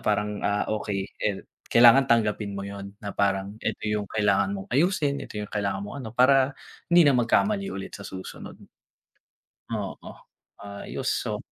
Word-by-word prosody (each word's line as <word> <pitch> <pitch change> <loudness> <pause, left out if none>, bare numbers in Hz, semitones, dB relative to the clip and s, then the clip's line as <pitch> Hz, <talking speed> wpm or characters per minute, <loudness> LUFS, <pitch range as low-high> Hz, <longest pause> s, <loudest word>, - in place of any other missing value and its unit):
parang, 105 0 -1
ah, 105 0 0
okey, 100 -2 -2 0.2
eh, 100 -2 -1 0.2
kailangan 120 +3 +7
tanggapin 105 -3 +1
mo. 100 - -4
Yun 100 0 -8
na 100 - -4
parang 100 +1 -1
eto - - -3
yung 105 -1 -1
kailangan 100 -2 +1
mong 95 - -8
ayusin, 145 -1 +2
ito - - -8
yung 105 -1 -5
kailangan 100 -1 -2
mong 105 - -7
ano. 120 - -6
Para 135 +1 +4 0.3
hindi 175 -1 +6
na 145 - +5
magkamali 195 - +2
ulit 95 - -6
sa 100 - -8
susunod, 95 0 -9 1.1
oo 105 -4 -5 0.5
ayus 100 0 -4
oh. - - -3
105 Hz, 155 wpm, -26 LUFS, 100-125 Hz, 1.1 s, kailangan